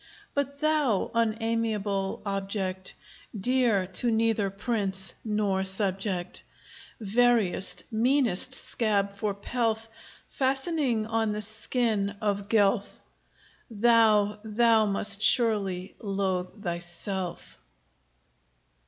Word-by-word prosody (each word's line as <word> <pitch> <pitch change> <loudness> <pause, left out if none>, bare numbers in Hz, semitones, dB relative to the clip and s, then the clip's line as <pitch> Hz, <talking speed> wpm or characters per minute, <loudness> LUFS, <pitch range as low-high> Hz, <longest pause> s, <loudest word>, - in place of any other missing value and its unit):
But 280 0 -2
thou, 300 -9 +1
unamiable 220 -3 -1
object, 195 -1 -3 0.4
Dear 240 -3 +2
to 190 +6 +2
neither 225 -3 +1
prince 195 -3 -2
nor 210 -3 0
subject, 190 -1 -2 0.6
Veriest, 210 -5 +1
meanest 250 0 +2
scab 205 -5 +1
for 200 0 -3
pelf 225 +1 -2 0.4
Fastening 270 -3 0
on 225 -1 0
the 210 - -3
skin 220 -1 -1
of 205 -2 -2
Guelph, 205 -1 +2 0.7
Thou, 215 -2 +3
thou 220 0 +3
must 200 0 0
surely 200 -6 +2
loathe 195 -1 -3
thyself. 175 +1 -5
210 Hz, 85 wpm, -27 LUFS, 195-230 Hz, 0.7 s, Thou